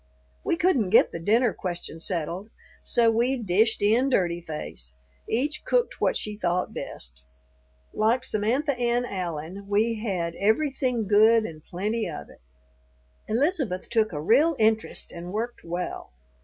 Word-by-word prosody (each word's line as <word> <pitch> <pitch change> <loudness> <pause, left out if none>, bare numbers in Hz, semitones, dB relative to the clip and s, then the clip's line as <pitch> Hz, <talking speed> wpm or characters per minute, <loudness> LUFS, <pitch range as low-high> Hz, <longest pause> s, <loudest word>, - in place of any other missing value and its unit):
We - - +1
couldn't 305 - +2
get - - +5
the 170 - -5
dinner 220 +6 +2
question 175 -3 -5
settled, 175 +3 -3 0.3
so 230 -2 +3
we 240 +4 +1
"dished 220 0 +1
in 235 +6 +3
dirty 175 -8 +1
face"; 75 - -7 0.3
each 285 +6 0
cooked - - 0
what - - +2
she 210 -1 -4
thought 180 -3 -1
best. 60 0 -2 0.7
Like 230 +4 +2
Samantha 260 +6 0
Ann 240 0 +1
Allen, 180 -1 -5
we 220 +2 +1
had 180 -6 -2
"everything 250 0 +1
good 220 +2 +5
and 155 -4 -8
plenty 210 +5 -2
of 70 - -8
it." - - -19 0.9
Elizabeth 255 - 0
took 220 -2 +2
a 150 - -4
real 280 - +4
interest 220 0 +1
and 175 +1 -8
worked 230 +4 -4
well. 175 - -5
215 Hz, 140 wpm, -26 LUFS, 175-240 Hz, 0.9 s, get